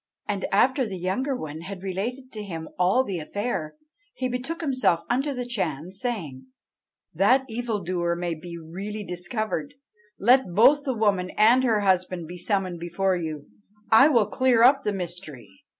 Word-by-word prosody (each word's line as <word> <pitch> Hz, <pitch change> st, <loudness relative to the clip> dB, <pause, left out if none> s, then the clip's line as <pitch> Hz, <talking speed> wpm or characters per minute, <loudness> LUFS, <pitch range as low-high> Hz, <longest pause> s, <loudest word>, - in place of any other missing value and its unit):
And 200 Hz, -2 st, -2 dB
after 255 Hz, +5 st, +3 dB
the 190 Hz, -2 st, -5 dB
younger 225 Hz, +10 st, -1 dB
one 155 Hz, -8 st, -6 dB
had 190 Hz, +1 st, -8 dB
related 235 Hz, +8 st, -4 dB
to 215 Hz, -, -7 dB
him 165 Hz, -6 st, -6 dB
all 190 Hz, +8 st, +4 dB
the 190 Hz, -7 st, -4 dB
affair, 165 Hz, 0 st, -3 dB, 0.4 s
he 255 Hz, -, -1 dB
betook 255 Hz, +7 st, -4 dB
himself 255 Hz, -, +1 dB
unto 270 Hz, +4 st, +1 dB
the 250 Hz, -2 st, -4 dB
Chan, 180 Hz, -, -3 dB
saying, 185 Hz, -, -5 dB, 0.7 s
'That 245 Hz, -, +3 dB
the 230 Hz, -, -11 dB
evildoer 185 Hz, -7 st, -1 dB
may 175 Hz, 0 st, -2 dB
be 170 Hz, +2 st, -8 dB
really 195 Hz, +6 st, -6 dB
discovered, 215 Hz, +9 st, -4 dB, 0.4 s
let 245 Hz, -4 st, +3 dB
both 275 Hz, +7 st, +5 dB
the 260 Hz, -3 st, -1 dB
woman 200 Hz, -4 st, +1 dB
and 235 Hz, +5 st, +5 dB
her 225 Hz, -4 st, +2 dB
husband 185 Hz, -3 st, +1 dB
be 180 Hz, +2 st, -8 dB
summoned 185 Hz, -2 st, -1 dB
before 180 Hz, +3 st, 0 dB
you; 155 Hz, -4 st, -5 dB, 0.5 s
I 225 Hz, +6 st, +8 dB
will 240 Hz, -8 st, +4 dB
clear 240 Hz, +2 st, +3 dB
up 275 Hz, +3 st, +6 dB
the 210 Hz, -, 0 dB
mystery.' 175 Hz, -, -7 dB
200 Hz, 165 wpm, -25 LUFS, 175-250 Hz, 0.7 s, I